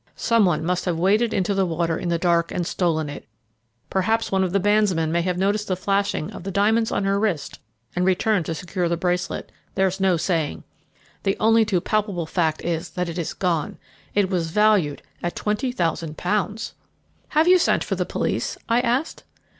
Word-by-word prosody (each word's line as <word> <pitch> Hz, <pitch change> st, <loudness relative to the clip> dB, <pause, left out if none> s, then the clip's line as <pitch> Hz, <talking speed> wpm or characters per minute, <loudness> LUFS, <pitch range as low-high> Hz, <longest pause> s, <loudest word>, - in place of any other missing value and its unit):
Some 230 Hz, -3 st, +3 dB
one 165 Hz, -3 st, +1 dB
must 180 Hz, +1 st, 0 dB
have 175 Hz, -3 st, 0 dB
waded 210 Hz, +7 st, +2 dB
into 195 Hz, +1 st, 0 dB
the 195 Hz, 0 st, +2 dB
water 170 Hz, -1 st, 0 dB
in 175 Hz, -, -3 dB
the 170 Hz, -, +1 dB
dark 170 Hz, -1 st, +1 dB
and 175 Hz, -, -2 dB
stolen 165 Hz, -4 st, 0 dB
it. 145 Hz, -, -8 dB, 0.6 s
Perhaps 220 Hz, +4 st, +1 dB
one 190 Hz, -1 st, +2 dB
of 185 Hz, -, -1 dB
the 200 Hz, -, +2 dB
bandsmen 195 Hz, -5 st, +2 dB
may 170 Hz, +1 st, +2 dB
have 180 Hz, 0 st, -1 dB
noticed 205 Hz, +3 st, 0 dB
the 185 Hz, -, 0 dB
flashing 195 Hz, -3 st, -1 dB
of -, -, -8 dB
the 195 Hz, -, -4 dB
diamonds 220 Hz, +3 st, +2 dB
on -, -, 0 dB
her 195 Hz, 0 st, +1 dB
wrist 200 Hz, -8 st, -2 dB, 0.4 s
and 180 Hz, -, +1 dB
returned 190 Hz, 0 st, +2 dB
to 165 Hz, -, -2 dB
secure 180 Hz, +1 st, -2 dB
the 170 Hz, -, 0 dB
bracelet 180 Hz, +1 st, -2 dB, 0.2 s
there's 190 Hz, 0 st, +1 dB
no 190 Hz, -2 st, +3 dB
saying. 160 Hz, -3 st, -1 dB, 0.6 s
The 195 Hz, 0 st, 0 dB
only 225 Hz, 0 st, +4 dB
too 190 Hz, -5 st, +1 dB
palpable 205 Hz, -5 st, -1 dB
fact 160 Hz, -1 st, -1 dB
is 170 Hz, 0 st, -2 dB
that 180 Hz, -1 st, -3 dB
it 170 Hz, +1 st, -4 dB
is 165 Hz, -, -3 dB
gone 170 Hz, -5 st, -1 dB, 0.4 s
it 205 Hz, -2 st, +3 dB
was 170 Hz, -3 st, 0 dB
valued 205 Hz, -6 st, +2 dB, 0.2 s
at 175 Hz, -, -3 dB
twenty 210 Hz, +5 st, -1 dB
thousand 165 Hz, -8 st, -2 dB
pounds!" 210 Hz, +3 st, -1 dB, 0.6 s
"Have 315 Hz, +2 st, +5 dB
you 365 Hz, 0 st, +7 dB
sent -, -, +2 dB
for -, -, -3 dB
the -, -, 0 dB
police?" -, -, -2 dB
I 230 Hz, 0 st, +3 dB
asked. 250 Hz, +6 st, -1 dB
185 Hz, 195 wpm, -23 LUFS, 170-210 Hz, 0.6 s, you